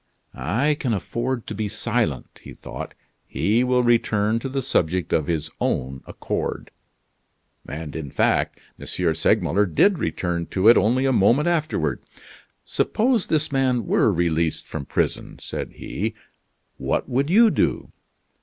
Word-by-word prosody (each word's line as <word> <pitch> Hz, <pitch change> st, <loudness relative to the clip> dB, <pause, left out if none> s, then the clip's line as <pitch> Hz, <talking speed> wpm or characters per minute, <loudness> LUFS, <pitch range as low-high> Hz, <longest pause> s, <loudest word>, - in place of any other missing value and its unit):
"I 115 Hz, -, 0 dB
can 120 Hz, -6 st, 0 dB
afford 120 Hz, +5 st, -3 dB
to -, -, -5 dB
be 105 Hz, 0 st, -2 dB
silent," 105 Hz, +1 st, -2 dB
he -, -, -11 dB
thought; -, -, -8 dB, 0.3 s
"he 110 Hz, +5 st, +1 dB
will 125 Hz, 0 st, +2 dB
return 115 Hz, -2 st, +2 dB
to 135 Hz, -, -5 dB
the 135 Hz, 0 st, -2 dB
subject 90 Hz, -, 0 dB
of 75 Hz, -3 st, +1 dB
his 80 Hz, -2 st, -2 dB
own 65 Hz, +1 st, -1 dB
accord." -, -, -4 dB, 1.0 s
And 75 Hz, +1 st, -6 dB
in 80 Hz, -3 st, -5 dB
fact -, -, +1 dB, 0.2 s
M. -, -, -9 dB, 0.3 s
Segmuller 95 Hz, +3 st, +2 dB
did 180 Hz, -, +3 dB
return 85 Hz, -2 st, -2 dB
to 95 Hz, +2 st, +1 dB
it 120 Hz, -, +8 dB
only 125 Hz, +5 st, +2 dB
a 135 Hz, -, +3 dB
moment 120 Hz, -, +3 dB
afterward. 155 Hz, -, 0 dB, 0.6 s
"Suppose 235 Hz, -2 st, +1 dB
this 155 Hz, -1 st, 0 dB
man 130 Hz, -4 st, +1 dB
were 105 Hz, -, +3 dB
released 85 Hz, -3 st, 0 dB
from 70 Hz, -3 st, -6 dB
prison," -, -, -2 dB
said -, -, -6 dB
he, -, -, -4 dB, 0.6 s
"what -, -, -1 dB
would 135 Hz, +4 st, 0 dB
you 220 Hz, +4 st, +6 dB
do?" -, -, 0 dB
110 Hz, 145 wpm, -23 LUFS, 85-130 Hz, 1.0 s, it